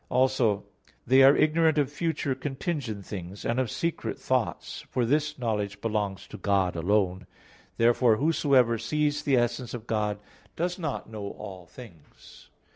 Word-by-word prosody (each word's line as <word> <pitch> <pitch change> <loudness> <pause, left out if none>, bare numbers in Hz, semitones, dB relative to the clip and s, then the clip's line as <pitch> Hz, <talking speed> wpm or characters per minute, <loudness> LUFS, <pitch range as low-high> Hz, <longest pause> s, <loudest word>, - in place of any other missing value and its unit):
Also 125 -5 +2 0.4
they 130 +2 +5
are 135 +1 +8
ignorant 160 0 +3
of 145 -2 +1
future 150 -3 -1
contingent 135 - -4
things, 95 0 -7
and 120 +2 0
of 130 -3 0
secret 170 +7 -3
thoughts; - - -2
for 125 - 0
this 150 +4 0
knowledge 105 -5 -2
belongs 105 -3 -2
to - - -10
God 95 -3 +1
alone. 95 +1 0 0.5
Therefore 115 0 +4
whosoever 135 -6 +3
sees 145 +5 0
the 135 -3 +2
essence 120 0 -1
of 115 -2 -8
God, 105 -2 -1 0.4
does 175 +2 -2
not 160 -5 -3
know 105 -2 -6
all 95 -2 -9
things. 85 - -15
120 Hz, 145 wpm, -27 LUFS, 105-145 Hz, 0.5 s, are